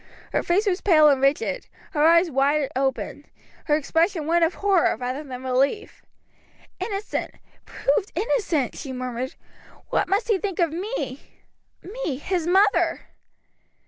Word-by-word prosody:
Her -, -, +2 dB
face 380 Hz, +5 st, +1 dB
was 380 Hz, -2 st, 0 dB
pale 310 Hz, -6 st, +6 dB
and 275 Hz, -2 st, +2 dB
rigid, 295 Hz, -, 0 dB, 0.2 s
her 300 Hz, -5 st, +1 dB
eyes 335 Hz, +1 st, +5 dB
wide 280 Hz, +1 st, +1 dB
open, 265 Hz, 0 st, -2 dB, 0.4 s
her 295 Hz, -, +3 dB
expression 325 Hz, +2 st, 0 dB
one 340 Hz, +2 st, +2 dB
of 330 Hz, +1 st, +2 dB
horror 390 Hz, -4 st, +2 dB
rather 255 Hz, +4 st, -4 dB
than 260 Hz, -3 st, -8 dB
relief. 265 Hz, -, -1 dB, 0.8 s
"Innocent! 405 Hz, -1 st, -4 dB, 0.3 s
Proved -, -, -1 dB
innocent!" 350 Hz, -, 0 dB
she 270 Hz, -4 st, -6 dB
murmured. 255 Hz, 0 st, -4 dB, 0.5 s
"What -, -, +1 dB
must 400 Hz, +5 st, +1 dB
he 415 Hz, -4 st, +3 dB
think 390 Hz, -3 st, -3 dB
of 340 Hz, -4 st, +2 dB
me 405 Hz, +9 st, -4 dB, 0.6 s
me, 385 Hz, -, -4 dB
his 345 Hz, +3 st, -2 dB
mother!" 390 Hz, +3 st, +3 dB
330 Hz, 140 wpm, -24 LUFS, 275-395 Hz, 0.8 s, pale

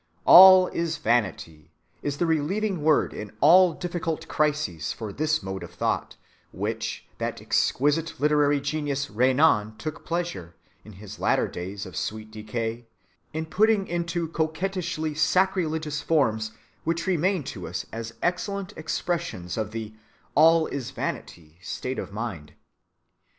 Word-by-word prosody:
"All 185 Hz, 0 st, +10 dB
is 165 Hz, -1 st, -2 dB
vanity" 95 Hz, -, -1 dB, 0.3 s
is 145 Hz, -1 st, -3 dB
the 175 Hz, -, +1 dB
relieving 175 Hz, +4 st, 0 dB
word 155 Hz, 0 st, +3 dB
in 105 Hz, -1 st, -7 dB
all 175 Hz, +5 st, +6 dB
difficult 170 Hz, -1 st, -4 dB
crises 150 Hz, -, -1 dB
for 110 Hz, -3 st, -6 dB
this 155 Hz, +1 st, 0 dB
mode 95 Hz, -1 st, -5 dB
of 85 Hz, 0 st, -10 dB
thought, -, -, -1 dB, 0.4 s
which -, -, -4 dB
that -, -, -3 dB
exquisite 150 Hz, +4 st, 0 dB
literary 145 Hz, 0 st, +3 dB
genius 145 Hz, -1 st, -2 dB
Renan 125 Hz, -2 st, +3 dB
took 155 Hz, +8 st, -6 dB
pleasure, 170 Hz, -, -4 dB, 0.3 s
in 110 Hz, -, -13 dB
his 105 Hz, +2 st, -11 dB
later -, -, +2 dB
days 95 Hz, +3 st, -6 dB
of 95 Hz, -, -10 dB
sweet 110 Hz, 0 st, -4 dB
decay, 115 Hz, +2 st, -4 dB, 0.4 s
in 160 Hz, +1 st, -3 dB
putting 205 Hz, +4 st, +2 dB
into 170 Hz, 0 st, -2 dB
coquettishly 160 Hz, -1 st, -2 dB
sacrilegious 160 Hz, -2 st, +1 dB
forms 110 Hz, -9 st, +1 dB, 0.3 s
which 165 Hz, +1 st, -1 dB
remain 185 Hz, -1 st, +1 dB
to 100 Hz, -10 st, -7 dB
us 85 Hz, +2 st, -4 dB
as 115 Hz, 0 st, -6 dB
excellent 195 Hz, +3 st, -2 dB
expressions 155 Hz, -, -3 dB
of 110 Hz, -2 st, -2 dB
the 110 Hz, -1 st, -6 dB, 0.4 s
"all 160 Hz, +1 st, +5 dB
is 135 Hz, -6 st, -4 dB
vanity" 80 Hz, 0 st, -6 dB
state 125 Hz, +5 st, -4 dB
of -, -, -6 dB
mind. 100 Hz, -9 st, -6 dB
150 Hz, 135 wpm, -25 LUFS, 110-165 Hz, 0.4 s, All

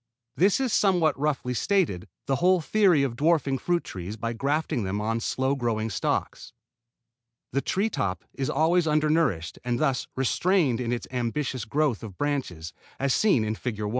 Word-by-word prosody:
This 195 Hz, +6 st, +3 dB
is, 260 Hz, -4 st, 0 dB
somewhat 180 Hz, -6 st, +3 dB
roughly 140 Hz, -4 st, -1 dB
stated, 150 Hz, -, 0 dB, 0.2 s
the 135 Hz, -1 st, 0 dB
whole 185 Hz, +1 st, +4 dB
theory 180 Hz, -3 st, +3 dB
of 130 Hz, -4 st, -2 dB
dwarfing 145 Hz, -2 st, +1 dB
fruit 175 Hz, -1 st, 0 dB
trees 95 Hz, +4 st, -7 dB
by 115 Hz, +1 st, -3 dB
grafting 140 Hz, +2 st, -1 dB
them 100 Hz, +2 st, -2 dB
on 115 Hz, +2 st, -1 dB
slow 130 Hz, +3 st, 0 dB
growing 115 Hz, -4 st, -1 dB
stocks. 90 Hz, -, -2 dB, 1.0 s
The 140 Hz, -, 0 dB
tree 195 Hz, +8 st, 0 dB
top 95 Hz, -, -2 dB
is 135 Hz, -, -3 dB
always 160 Hz, +3 st, +2 dB
under 155 Hz, 0 st, +2 dB
nourished 115 Hz, -, 0 dB
and 120 Hz, -1 st, -1 dB
thus 135 Hz, -2 st, 0 dB
restrained 135 Hz, -1 st, +1 dB
in 120 Hz, -1 st, -2 dB
its 120 Hz, -, -2 dB
ambitious 125 Hz, 0 st, -2 dB
growth 140 Hz, -1 st, 0 dB
of 105 Hz, -5 st, -9 dB
branches, 110 Hz, -, -3 dB, 0.3 s
as 140 Hz, -1 st, +1 dB
seen 185 Hz, -, +3 dB
in 110 Hz, -, -1 dB
Fig. 110 Hz, -1 st, -5 dB
1. 105 Hz, -, -2 dB
135 Hz, 170 wpm, -26 LUFS, 115-160 Hz, 1.0 s, whole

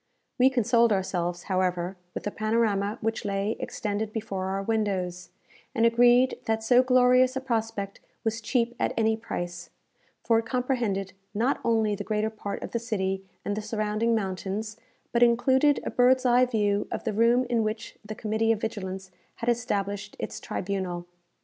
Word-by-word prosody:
We 255 Hz, +1 st, +7 dB
consoled 235 Hz, -2 st, +3 dB
ourselves, 175 Hz, -3 st, -1 dB
however, 185 Hz, -1 st, -1 dB, 0.2 s
with -, -, -4 dB
the 205 Hz, -, -2 dB
panorama 215 Hz, -1 st, 0 dB
which 225 Hz, 0 st, -1 dB
lay 200 Hz, +1 st, -1 dB
extended 210 Hz, 0 st, -3 dB
before 210 Hz, -4 st, -3 dB
our 195 Hz, +1 st, -2 dB
windows, 195 Hz, -5 st, -1 dB, 0.5 s
and 230 Hz, -1 st, +3 dB
agreed 245 Hz, +2 st, +4 dB
that 220 Hz, 0 st, 0 dB
so 245 Hz, +2 st, +5 dB
glorious 255 Hz, 0 st, +4 dB
a -, -, 0 dB
prospect 225 Hz, -5 st, -3 dB, 0.2 s
was 225 Hz, 0 st, -1 dB
cheap 235 Hz, +1 st, 0 dB
at -, -, 0 dB
any 220 Hz, -1 st, +3 dB
price; 175 Hz, -6 st, -5 dB, 0.5 s
for 230 Hz, -1 st, +3 dB
it 225 Hz, -, -5 dB
comprehended, 235 Hz, -7 st, -1 dB, 0.2 s
not 240 Hz, +6 st, +1 dB
only 220 Hz, -2 st, +2 dB
the 205 Hz, 0 st, -4 dB
greater 215 Hz, +1 st, -1 dB
part 205 Hz, -2 st, -5 dB
of -, -, -6 dB
the 235 Hz, -, -1 dB
city 195 Hz, -4 st, -2 dB, 0.2 s
and 205 Hz, -, -1 dB
the 215 Hz, -, -3 dB
surrounding 215 Hz, +1 st, 0 dB
mountains, 200 Hz, +1 st, -3 dB, 0.4 s
but 235 Hz, -, +1 dB
included 260 Hz, +4 st, +4 dB
a -, -, -3 dB
bird's 255 Hz, +1 st, +4 dB
eye 250 Hz, +1 st, +5 dB
view 205 Hz, -4 st, +1 dB
of -, -, -3 dB
the -, -, -1 dB
room 235 Hz, +4 st, +3 dB
in 240 Hz, -2 st, +1 dB
which 215 Hz, +1 st, -4 dB
the 215 Hz, +1 st, -7 dB
Committee 220 Hz, +1 st, 0 dB
of 225 Hz, -, +1 dB
Vigilance 190 Hz, -3 st, -4 dB, 0.2 s
had 235 Hz, -, -2 dB
established 205 Hz, -4 st, -1 dB
its -, -, -5 dB
tribunal. 185 Hz, -2 st, -3 dB
220 Hz, 165 wpm, -27 LUFS, 200-235 Hz, 0.5 s, We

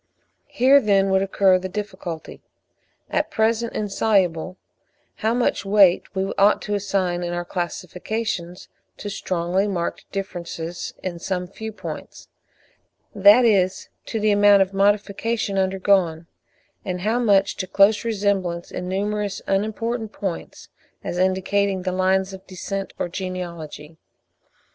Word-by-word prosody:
Here, 270 Hz, +3 st, +5 dB
then, 195 Hz, -3 st, +3 dB
would 190 Hz, 0 st, +3 dB
occur 195 Hz, -1 st, +3 dB
the 185 Hz, +1 st, -5 dB
difficulty, 185 Hz, -5 st, -6 dB, 0.7 s
at 305 Hz, +1 st, 0 dB
present 230 Hz, -3 st, 0 dB
insoluble, 190 Hz, -4 st, 0 dB, 0.6 s
how 225 Hz, +2 st, 0 dB
much 245 Hz, -, +1 dB
weight 195 Hz, -2 st, +4 dB
we 190 Hz, 0 st, -1 dB
ought 200 Hz, +1 st, +5 dB
to 210 Hz, -, -3 dB
assign 190 Hz, -3 st, 0 dB
in 175 Hz, 0 st, -3 dB
our 175 Hz, 0 st, -3 dB
classifications 180 Hz, +1 st, -4 dB, 0.3 s
to 205 Hz, -, -6 dB
strongly 185 Hz, +1 st, -1 dB
marked 175 Hz, -4 st, -4 dB
differences 175 Hz, -3 st, -5 dB
in 175 Hz, -2 st, -4 dB
some 180 Hz, +1 st, -2 dB
few 220 Hz, +4 st, -7 dB
points,—that 205 Hz, +1 st, -1 dB
is, 190 Hz, -4 st, +2 dB, 0.2 s
to 225 Hz, -, -2 dB
the 215 Hz, 0 st, +2 dB
amount 205 Hz, -1 st, +6 dB
of 190 Hz, +1 st, -9 dB
modification 205 Hz, +1 st, +1 dB
undergone; 190 Hz, -3 st, +1 dB, 0.6 s
and 180 Hz, -2 st, -4 dB
how 220 Hz, +5 st, +1 dB
much 200 Hz, -4 st, +3 dB
to 185 Hz, -, -3 dB
close 200 Hz, +4 st, +4 dB
resemblance 195 Hz, -6 st, -1 dB
in 180 Hz, -, -5 dB
numerous 205 Hz, +1 st, -2 dB
unimportant 220 Hz, +3 st, -1 dB
points, 190 Hz, -6 st, -6 dB, 0.3 s
as 175 Hz, -, -3 dB
indicating 190 Hz, +1 st, +1 dB
the 185 Hz, -, -1 dB
lines 190 Hz, +1 st, +1 dB
of 190 Hz, 0 st, -11 dB
descent 195 Hz, +1 st, -5 dB
or -, -, -1 dB
genealogy. 170 Hz, -4 st, -6 dB
195 Hz, 125 wpm, -22 LUFS, 180-205 Hz, 0.7 s, amount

